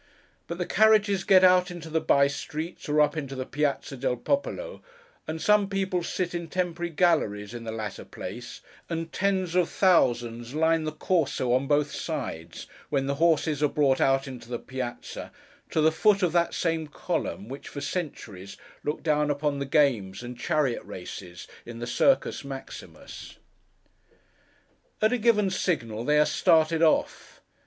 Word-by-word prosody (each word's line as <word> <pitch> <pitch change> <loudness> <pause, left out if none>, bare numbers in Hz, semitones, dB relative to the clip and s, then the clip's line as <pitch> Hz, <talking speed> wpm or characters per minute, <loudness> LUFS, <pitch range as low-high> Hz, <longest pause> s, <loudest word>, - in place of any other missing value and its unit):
But 170 - -5
the 180 - -2
carriages 210 -2 +4
get 185 -1 +6
out 180 0 +5
into 175 -2 -8
the 160 0 0
by 140 -3 +4
streets, 155 +4 -5
or 150 +1 +4
up 150 - +2
into 140 -3 -4
the 130 0 -4
Piázza 145 -1 -2
del 130 -1 0
Popolo, 485 - -2 0.5
and 160 +1 -4
some 205 +4 +3
people 190 -2 -1
sit 180 +1 -3
in 170 -1 -4
temporary 175 -1 -2
galleries 150 - +1
in 120 -1 -7
the 110 - -4
latter 110 -3 -5
place, 120 +6 -8 0.3
and 165 -1 -4
tens 190 -3 0
of 180 -1 +2
thousands 120 - +2
line 160 0 +2
the 155 - -2
Corso 155 -6 0
on 130 +2 +1
both 145 0 +2
sides, 80 +1 -5 0.2
when 140 -2 0
the 140 - 0
horses 160 -3 +2
are 150 - +4
brought 135 -3 +2
out 135 0 +2
into 125 -3 -9
the 120 - -2
Piázza—to 130 +5 -7
the 160 +1 +5
foot 200 +4 +3
of 175 - +2
that 170 0 +1
same 165 -2 -1
column 120 -7 -3
which, 135 +3 -8
for 145 - -7
centuries, 110 - -5 0.3
looked 150 - -3
down 150 -2 +2
upon 145 0 -1
the 140 - -3
games 125 -9 +1
and 125 0 -7
chariot 145 -2 0
races 90 -1 -9 0.2
in 120 -1 -9
the 120 - -5
Circus 210 - +2
Maximus. 135 -1 -9 1.6
At 215 +3 +3
a 250 - 0
given 210 -4 +3
signal 115 - -1
they 150 +4 +2
are 150 - +5
started 160 +1 +3
off. 160 -2 +1
150 Hz, 165 wpm, -27 LUFS, 130-175 Hz, 1.6 s, get